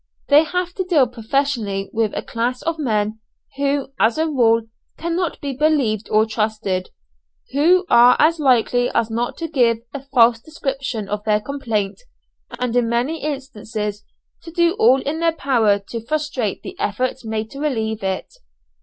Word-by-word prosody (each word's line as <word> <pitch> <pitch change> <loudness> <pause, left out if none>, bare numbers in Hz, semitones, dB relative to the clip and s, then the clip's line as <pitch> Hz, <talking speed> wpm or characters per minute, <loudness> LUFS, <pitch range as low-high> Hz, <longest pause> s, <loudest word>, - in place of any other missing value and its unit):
They 295 +2 +6
have 360 +2 -2
to 375 - -2
deal 335 -7 +3
professionally 230 -4 -2
with 225 -2 0
a - - -3
class 240 +2 -2
of 330 -1 -2
men 215 -5 -1 0.4
who, 280 -1 0
as 225 +4 +3
a 320 - +2
rule, 230 -7 +3 0.3
cannot 340 0 -2
be 280 -1 -3
believed 265 -7 +1
or 215 +1 +4
trusted; 215 -4 -2 0.6
who 345 +7 +4
are 245 +1 +7
as 320 +2 +3
likely 245 -3 +3
as 225 -1 +1
not 235 +2 -2
to 330 - -3
give 245 -7 +2 0.2
a 280 - -5
false 240 -4 +4
description 270 -6 -4
of 210 +1 -3
their 210 -1 +3
complaint, 220 - -3 0.6
and 250 -1 -1
in 240 -2 +2
many 250 +8 -1
instances 215 -7 -4 0.4
to - - -10
do 340 0 +2
all 270 - +5
in 300 +3 -2
their 335 -1 +2
power 235 -9 +2
to 230 -2 -5
frustrate 275 -6 -2
the - - -8
efforts 255 +5 -2
made 220 -1 -4
to 275 - -9
relieve 225 -7 -1
it. 190 -1 -3
245 Hz, 165 wpm, -20 LUFS, 220-295 Hz, 0.6 s, are